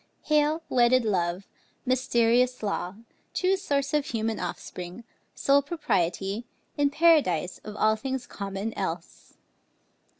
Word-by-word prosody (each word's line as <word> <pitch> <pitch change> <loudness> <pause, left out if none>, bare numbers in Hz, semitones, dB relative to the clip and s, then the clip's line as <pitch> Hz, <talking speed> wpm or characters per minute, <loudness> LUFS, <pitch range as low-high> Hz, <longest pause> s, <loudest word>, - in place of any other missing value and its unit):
Hail, 305 +1 +2
wedded 245 0 +4
love, 180 -2 0 0.4
mysterious 250 -1 +2
law, 195 -2 -2 0.4
true 375 +1 +3
source 285 -7 -1
Of 295 -2 +1
human 225 -1 -2
offspring, 180 +3 -6 0.3
sole 280 +1 +4
propriety, 205 - -1 0.3
In 285 -1 +2
Paradise 285 - +3
of 210 -1 -8
all 215 +1 +3
things 260 +2 -4
common 200 +2 -5
else! 175 -3 -6
235 Hz, 110 wpm, -27 LUFS, 195-280 Hz, 0.4 s, wedded